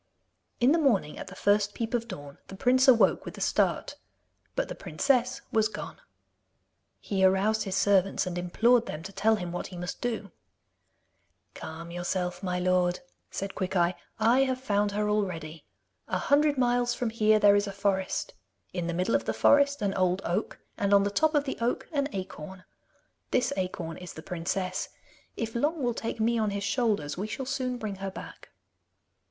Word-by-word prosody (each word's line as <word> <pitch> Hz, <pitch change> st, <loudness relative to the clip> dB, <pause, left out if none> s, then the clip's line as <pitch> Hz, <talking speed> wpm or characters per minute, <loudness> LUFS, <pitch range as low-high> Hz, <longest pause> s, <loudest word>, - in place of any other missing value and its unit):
In 245 Hz, +3 st, +5 dB
the 330 Hz, -, +4 dB
morning, 210 Hz, -, +1 dB
at -, -, -7 dB
the 195 Hz, -, -10 dB
first 205 Hz, +1 st, +2 dB
peep 230 Hz, 0 st, -3 dB
of 235 Hz, -1 st, 0 dB
dawn, 145 Hz, -9 st, -9 dB
the 195 Hz, -, -9 dB
prince 255 Hz, +6 st, +3 dB
awoke 225 Hz, -7 st, +5 dB
with -, -, -8 dB
a -, -, -7 dB
start. -, -, +1 dB, 0.6 s
But -, -, 0 dB
the -, -, -5 dB
princess 255 Hz, -2 st, 0 dB
was 220 Hz, -1 st, +3 dB
gone. 210 Hz, -1 st, -8 dB, 1.0 s
He 195 Hz, -2 st, -1 dB
aroused 195 Hz, +4 st, +3 dB
his 195 Hz, -1 st, -2 dB
servants 195 Hz, -1 st, +3 dB
and 180 Hz, -1 st, -4 dB
implored 225 Hz, +7 st, +3 dB
them 150 Hz, +1 st, -5 dB
to 195 Hz, +3 st, -8 dB
tell 220 Hz, +3 st, +3 dB
him 180 Hz, -4 st, -5 dB
what 175 Hz, -, -4 dB
he 180 Hz, -, -10 dB
must 180 Hz, 0 st, -5 dB
do. 225 Hz, -5 st, -3 dB, 1.2 s
'Calm 165 Hz, +2 st, -8 dB
yourself, 180 Hz, 0 st, -2 dB
my 180 Hz, -2 st, -1 dB
lord,' 180 Hz, 0 st, +1 dB, 0.3 s
said 195 Hz, 0 st, -4 dB
Quickeye. 180 Hz, -2 st, +1 dB, 0.3 s
'I 230 Hz, +4 st, +4 dB
have 260 Hz, -1 st, -1 dB
found 205 Hz, -5 st, +1 dB
her 210 Hz, +1 st, 0 dB
already. 170 Hz, -7 st, -2 dB, 0.4 s
A -, -, 0 dB
hundred 290 Hz, 0 st, +3 dB
miles 245 Hz, -1 st, +2 dB
from 240 Hz, -3 st, -2 dB
here 215 Hz, -1 st, +4 dB
there 205 Hz, -1 st, +6 dB
is 205 Hz, 0 st, +2 dB
a -, -, -3 dB
forest. 195 Hz, -1 st, -1 dB, 0.4 s
In 175 Hz, -2 st, -2 dB
the 170 Hz, -, -2 dB
middle 185 Hz, +6 st, 0 dB
of -, -, +2 dB
the -, -, -1 dB
forest, 285 Hz, -2 st, +4 dB
an 195 Hz, -1 st, +1 dB
old 185 Hz, 0 st, +1 dB
oak, 170 Hz, -, -2 dB, 0.2 s
and 200 Hz, 0 st, +3 dB
on 200 Hz, -, +5 dB
the 200 Hz, -, 0 dB
top 315 Hz, +8 st, +2 dB
of 290 Hz, -, +3 dB
the 270 Hz, -, -5 dB
oak, 235 Hz, +1 st, -1 dB
an 280 Hz, -2 st, 0 dB
acorn. 185 Hz, -2 st, -7 dB, 0.7 s
This 250 Hz, -, +1 dB
acorn 180 Hz, -3 st, -3 dB
is 180 Hz, -1 st, -9 dB
the 160 Hz, -, -10 dB
princess. 180 Hz, +2 st, -3 dB, 0.5 s
If 225 Hz, -1 st, -3 dB
Long 295 Hz, +5 st, 0 dB
will 240 Hz, -1 st, +1 dB
take 225 Hz, 0 st, -4 dB
me 230 Hz, +1 st, +2 dB
on 215 Hz, -1 st, +1 dB
his 200 Hz, 0 st, -3 dB
shoulders, 200 Hz, -, 0 dB
we 205 Hz, -, -2 dB
shall 265 Hz, +5 st, -4 dB
soon 255 Hz, -2 st, -2 dB
bring 215 Hz, -4 st, -5 dB
her 195 Hz, 0 st, -4 dB
back. 190 Hz, -, -10 dB
205 Hz, 185 wpm, -28 LUFS, 185-240 Hz, 1.2 s, there